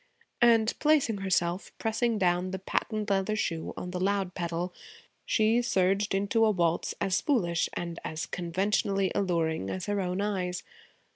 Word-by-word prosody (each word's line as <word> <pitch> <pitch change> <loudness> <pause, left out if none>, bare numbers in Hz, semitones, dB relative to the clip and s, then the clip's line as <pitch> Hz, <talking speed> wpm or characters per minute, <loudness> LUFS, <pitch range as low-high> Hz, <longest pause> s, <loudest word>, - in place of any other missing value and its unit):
And 230 -2 +5
placing 295 -8 +3
herself, 180 -1 0
pressing 225 +1 0
down 180 -1 +1
the 190 - -3
patent 210 +2 -2
leather 195 +2 +1
shoe 165 -6 -2
on 180 - -5
the 180 - -3
loud 195 -1 0
pedal, 175 0 -3 0.5
she 225 +2 +3
surged 195 -2 +1
into 205 +3 +2
a 220 - +5
waltz 170 -4 0
as 190 -2 +1
foolish 180 - +1
and 170 -1 -4
as 155 0 -4
conventionally 190 +2 0
alluring 165 - 0
as 185 - -4
her 205 -1 0
own 180 0 -2
eyes. 185 -3 -2
190 Hz, 150 wpm, -29 LUFS, 175-210 Hz, 0.5 s, And